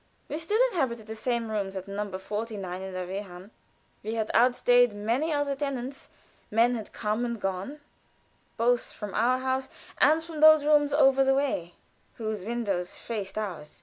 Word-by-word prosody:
We 300 - -3
still 415 +7 0
inhabited 240 - -1
the 220 0 -7
same 230 0 -2
rooms 200 -2 -2
at 190 0 -6
No. 200 -1 -4
45, 195 -2 -5
in 190 0 -6
the 185 0 -3
Wehrhahn. 190 +1 -7 0.5
We 220 +2 -4
had 220 -1 -1
outstayed 245 -1 +4
many 230 +10 -1
other 290 -2 0
tenants; 270 -1 -4 0.4
men 230 +3 +3
had 220 -4 -5
come 215 +2 -2
and 235 -2 -3
gone, 195 +10 -4 0.8
both 240 +1 +1
from 210 -3 -7
our 245 +4 +2
house 260 0 -2 0.3
and 310 +4 +5
from 325 -2 -7
those 310 -1 +7
rooms 295 -1 +4
over 270 -2 +5
the 270 0 +3
way 260 -12 -1 0.4
whose 215 -3 -4
windows 200 -5 -2
faced 205 -3 -5
ours. 180 -8 -5
230 Hz, 165 wpm, -27 LUFS, 205-270 Hz, 0.8 s, those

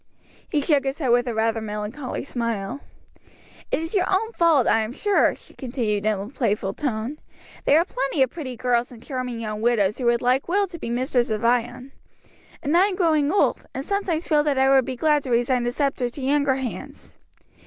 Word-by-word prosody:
He 295 - +1
shook 285 -1 +2
his 270 +1 -2
head 275 -6 -1
with 245 +1 +3
a 240 - -1
rather 225 0 +1
melancholy 215 +5 -5
smile. 230 -3 -3 0.9
"It - - 0
is 325 +1 -5
your 380 -2 +1
own 430 +4 +1
fault, 330 - +3
I 225 - +3
am 220 +2 -4
sure," 410 +7 +2
she - - -15
continued 225 -6 -2
in 215 -2 +1
a 200 - -5
playful 210 -6 -1
tone; 255 +2 -3 0.5
"there 290 - +5
are 335 - +3
plenty 270 -2 0
of 260 - -1
pretty 275 -7 -6
girls 245 +1 0
and 235 -2 -13
charming 255 -4 -4
young 215 -1 -4
widows 220 -3 +2
who 250 - -2
would 235 0 +2
like 255 +2 +2
well 400 +3 +2
to 340 -2 -9
be - - -5
mistress 245 0 0
of 220 +1 -2
Ion, 245 +2 0 0.7
and 295 +2 +1
I 365 +3 +6
am 395 - -3
growing 315 -5 +2
old, 400 - +1
and 265 - -4
sometimes 370 -4 -1
feel 300 -2 +4
that 295 -2 0
I 265 0 +4
would 265 -2 +5
be 260 - -4
glad 300 +3 +2
to 265 - -7
resign 240 +1 +1
the 240 - 0
sceptre 270 -2 -1
to 275 - -9
younger 280 0 +2
hands." 260 -2 -7
260 Hz, 210 wpm, -23 LUFS, 235-295 Hz, 0.9 s, I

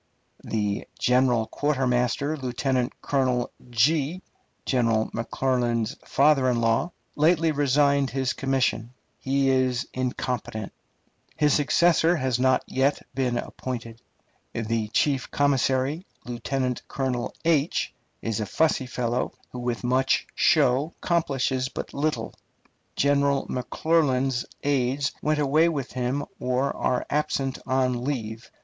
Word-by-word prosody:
The 105 -2 -2
chief 125 +1 +3 0.2
quartermaster, 135 0 0
Lieutenant 130 -1 -1
Colonel, 130 -3 0 0.2
General 125 -4 0
McClernand's 120 -1 -1
father 140 -2 +3
in 120 -1 +1
law, 115 +9 +1 0.2
lately 165 +1 +3
resigned 140 -1 +2
his 130 -2 -1
commission. 130 -3 -1 0.2
He 135 0 +1
was 130 -1 +1
incompetent.... 125 -4 -3 0.6
His 150 -2 +3
successor 165 +4 +3
has 130 -5 0
not 130 0 +3
yet 135 +2 0
been 125 -3 0
appointed. 115 -3 -6 0.5
The 115 -1 -1
chief 135 +4 +1
commissary, 140 +3 +1 0.2
Lieutenant 125 +1 -2
Colonel, 130 -3 -2
is 145 - -1
a 105 - -2
fussy 155 0 +1
fellow, 125 0 -2 0.2
who 125 - -6
with 120 -1 -3
much 130 +2 +2
show 135 +6 +3
accomplishes 135 -6 0
but - - -6
little. 150 +2 -1 0.6
General 140 0 +2
McClernand's 130 -1 +1 0.2
aides 140 0 +1
went 155 0 +1
away 150 +3 +3
with 140 -5 -3
him 130 +3 -2
or 130 +2 0
are 125 -1 0
absent 140 -2 -1
on 130 -2 +1
leave. 115 -5 -4
130 Hz, 110 wpm, -25 LUFS, 125-145 Hz, 0.6 s, chief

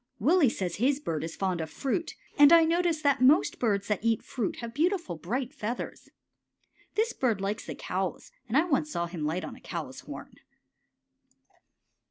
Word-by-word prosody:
Willie 300 - +4
says 180 -6 -3
his 270 +6 +2
bird 160 - -3
is 165 0 -5
fond 185 -3 -1
of 160 - -4
fruit, 285 - -2 0.2
and 290 +1 +8
I 335 -1 +8
notice 335 -1 +1
that 280 -3 +3
most 275 +6 +4
birds 205 -4 +1
that 210 -1 -1
eat 230 -1 +1
fruit 235 -7 -3
have 235 -1 -7
beautiful, 335 - 0
bright 245 - -3
feathers. 240 -3 -5 0.9
This 445 +2 +1
bird 235 -6 0
likes 200 +3 -3
the - - -5
cows, 185 0 -3 0.2
and 235 +4 +1
I 310 - +5
once 300 -2 +1
saw 170 - -1
him 170 -3 -5
light 165 +5 -1
on - - -8
a - - -16
cow's - - -6
horn. - - -10
240 Hz, 180 wpm, -28 LUFS, 190-300 Hz, 0.9 s, and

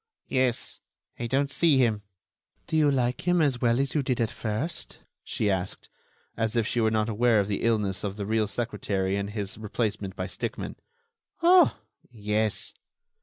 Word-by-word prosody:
"Yes, 130 -2 0 0.4
I 120 - -2
don't 140 +3 +1
see 155 -2 +4
him." 115 -5 +2 0.6
"Do - - -3
you 155 -2 +5
like 125 +3 0
him 175 0 +4
as 140 -6 +2
well 120 0 +3
as 135 0 0
you 150 - +2
did 130 -2 -1
at 115 -2 +1
first?" 120 +10 -3 0.3
she 105 - -1
asked, 95 -2 -2 0.5
as 110 0 -1
if 115 -2 +2
she 120 0 0
were 110 - +3
not 110 -1 +1
aware 115 0 +3
of 100 - +1
the 100 -1 -2
illness 105 -5 +1
of 100 0 -3
the 100 - -3
real 110 0 +1
secretary 100 -3 -1
and 100 0 -2
his 105 -1 -4
replacement 105 -3 -2
by - - -3
Stickmann. - - -4 0.7
"Oh! 355 0 +6 0.3
yes." 105 -1 -1
115 Hz, 170 wpm, -27 LUFS, 105-130 Hz, 0.7 s, Oh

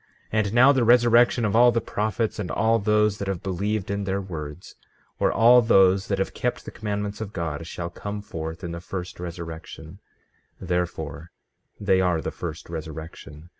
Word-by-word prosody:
15:22 110 0 +3
And 100 +1 -4
now, 130 +4 +7
the 130 -3 +2
resurrection 120 0 +5
of 105 - 0
all 120 +1 +7
the 115 - +1
prophets, 110 0 -2
and 100 - -3
all 115 +1 +2
those 105 0 +2
that 100 - -4
have 95 -3 -3
believed 100 +2 -2
in 100 0 -2
their 95 0 -1
words, 80 -3 -7 0.5
or - - +3
all 120 +2 +6
those 95 -4 +4
that 100 - 0
have 95 - -2
kept 125 - -3
the - - -7
commandments 105 0 -4
of 105 -1 -6
God, 80 -1 -4
shall 85 0 -5
come 105 +3 -6
forth 80 -1 -6
in 85 - -4
the 85 0 -6
first 90 -1 -6
resurrection; 85 0 -8 0.6
therefore, 85 -3 -3 0.5
they 95 -2 +2
are 90 -3 +2
the - - -4
first 80 -3 -7
resurrection. 80 -1 -8
95 Hz, 180 wpm, -24 LUFS, 85-110 Hz, 0.6 s, now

